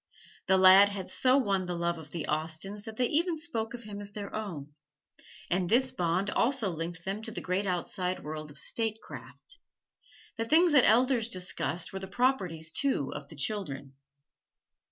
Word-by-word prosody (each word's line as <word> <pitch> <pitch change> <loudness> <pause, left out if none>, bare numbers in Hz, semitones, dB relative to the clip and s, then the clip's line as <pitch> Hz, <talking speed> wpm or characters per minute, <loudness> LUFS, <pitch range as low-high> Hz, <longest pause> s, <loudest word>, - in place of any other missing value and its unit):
The 190 - +5
lad 190 +2 +8
had 200 -2 -6
so 255 +1 +3
won 195 -8 0
the 175 - -3
love 170 0 -1
of 155 -2 -11
the 160 -1 -5
Austens 160 +7 -3
that 220 -1 -8
they 250 - +2
even 330 +6 +1
spoke 240 -8 -4
of 235 - -9
him 205 -1 -8
as 205 0 -7
their 200 -1 -7
own; 165 -10 -6 0.7
and 180 0 0
this 255 +3 +4
bond 180 +4 0
also 235 -5 +1
linked 165 +1 -5
them 195 +3 -3
to 225 - -5
the 225 - -5
great 190 +2 -1
outside 180 0 -2
world 155 0 -6
of 145 - -7
statecraft. 225 +6 -3 0.8
The 225 - -1
things 330 +7 +4
the 280 -4 +6
elders 240 +1 +4
discussed 180 -4 -2
were 190 - -4
the 190 - -7
properties, 190 -8 0
too, 260 - 0
of 140 -1 -8
the 155 - -11
children. 140 -6 -3
195 Hz, 175 wpm, -29 LUFS, 170-225 Hz, 0.8 s, lad